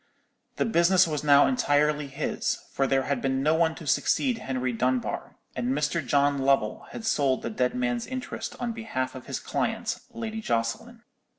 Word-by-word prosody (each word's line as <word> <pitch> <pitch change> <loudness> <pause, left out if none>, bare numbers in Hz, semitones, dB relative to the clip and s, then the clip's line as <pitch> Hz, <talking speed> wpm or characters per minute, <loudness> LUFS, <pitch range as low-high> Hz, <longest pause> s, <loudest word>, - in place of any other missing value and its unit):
The - - 0
business 185 -2 +4
was 150 -2 -2
now 145 -1 +6
entirely 150 - +2
his; 140 +3 -2
for 135 - +1
there 135 0 +2
had 140 -2 -1
been 135 0 0
no 155 +2 +4
one 160 0 +2
to 160 - -10
succeed 240 - +1
Henry 130 - -2
Dunbar, 125 +1 -1 0.2
and 125 +2 -1
Mr. 150 +2 0
John 140 +2 +2
Lovell 135 -5 +1
had 225 - -7
sold 145 -12 +1
the 115 - -3
dead 125 +3 0
man's 120 -1 -1
interest 255 -1 -5
on 240 -1 -2
behalf 220 - -3
of 130 - -10
his - - -3
client, - - -2
Lady 220 -1 -5
Jocelyn. 120 - -2
145 Hz, 175 wpm, -27 LUFS, 130-175 Hz, 0.2 s, now